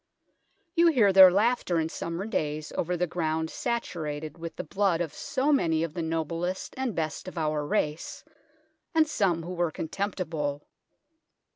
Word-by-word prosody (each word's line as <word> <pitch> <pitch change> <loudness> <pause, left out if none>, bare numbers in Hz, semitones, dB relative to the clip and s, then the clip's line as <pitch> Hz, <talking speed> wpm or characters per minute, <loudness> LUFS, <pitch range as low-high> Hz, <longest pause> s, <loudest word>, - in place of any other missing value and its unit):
You 340 0 +5
hear 230 -12 +4
their 190 -1 +10
laughter 200 -2 +2
in 160 - 0
summer 170 +3 -4
days 155 -7 -2
over 175 +1 -1
the 180 - +1
ground 160 -1 -2
saturated 155 - -3
with 165 -1 -7
the - - -4
blood 190 0 +1
of 165 -4 -2
so 280 +3 0
many 165 - +2
of 165 -2 -3
the 170 - -3
noblest 165 +3 -2
and 260 -4 -2
best 155 +2 -3
of 185 - -8
our 155 -2 0
race, 150 +1 -2 0.7
and 320 -1 +5
some 185 - +1
who 180 +2 -5
were 175 -1 0
contemptible. 160 -5 -3
170 Hz, 155 wpm, -28 LUFS, 160-195 Hz, 0.7 s, their